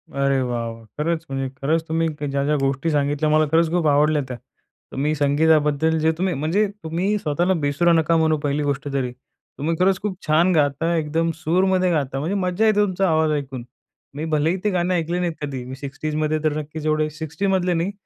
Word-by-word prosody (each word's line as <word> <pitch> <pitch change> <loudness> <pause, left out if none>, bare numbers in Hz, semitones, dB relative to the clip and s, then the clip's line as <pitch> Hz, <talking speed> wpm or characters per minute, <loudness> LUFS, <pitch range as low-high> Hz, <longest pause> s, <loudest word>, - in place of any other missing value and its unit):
अरे 140 -1 +2
वाह! 120 -2 -2
वाह! 115 0 -10
खरंच, 160 +2 -1
म्हणजे 135 -1 -2
खरंच 160 +4 +1
क - - -35
तुम्ही 165 +1 0 0.2
ज्या-ज्या 140 +2 +1
गोष्टी 135 +4 0
सांगितल्या 145 +1 +1
मला 155 0 +4
खरंच 165 0 +3
खूप 175 -3 +1
आवडल्या 150 +1 +3
त्या. 125 -1 -6 0.5
तर - - -9
मी 150 +3 +1
संगीताबद्दल 150 +1 +2
जे 160 +1 +3
तुम्ही 185 0 0
म्हणजे 165 +9 +1 0.2
तुम्ही 180 +6 0
स्वतःला 175 +3 +1
बेसुरा 145 +4 +2
नका 165 0 +3
म्हणू 160 -1 +2
पहिली 145 0 0
गोष्ट 145 0 -2
तरी. 130 -3 -1
तुम्ही 145 +5 -6
खरंच 190 +1 +3
खूप 200 -3 -3
छान 165 +4 +4
गाता, 150 +3 +1
एकदम 165 +1 0
सुरमध्ये 185 +3 +1
गाता, 140 -4 -1
म्हणजे 170 +8 -2
मज्जा 185 +2 0
येते 215 -1 +3
तुमचा 190 -1 0
आवाज 155 -1 +2
ऐकून. 135 -3 -6 0.5
मी 155 - -3
भलेही 160 +3 +1
ते 210 - +2
गाणं 180 0 0
ऐकले 170 0 -1
नाहीत 175 -2 -1
कधी, 135 -4 -4
मी 130 - -7
60sमध्ये 155 +3 -2
तर 155 -1 +1
नक्कीच 155 +1 -6
एवढे 155 0 +1
60मधले 175 +4 -1
नाही, 170 +4 -1
155 Hz, 195 wpm, -22 LUFS, 145-170 Hz, 0.5 s, मला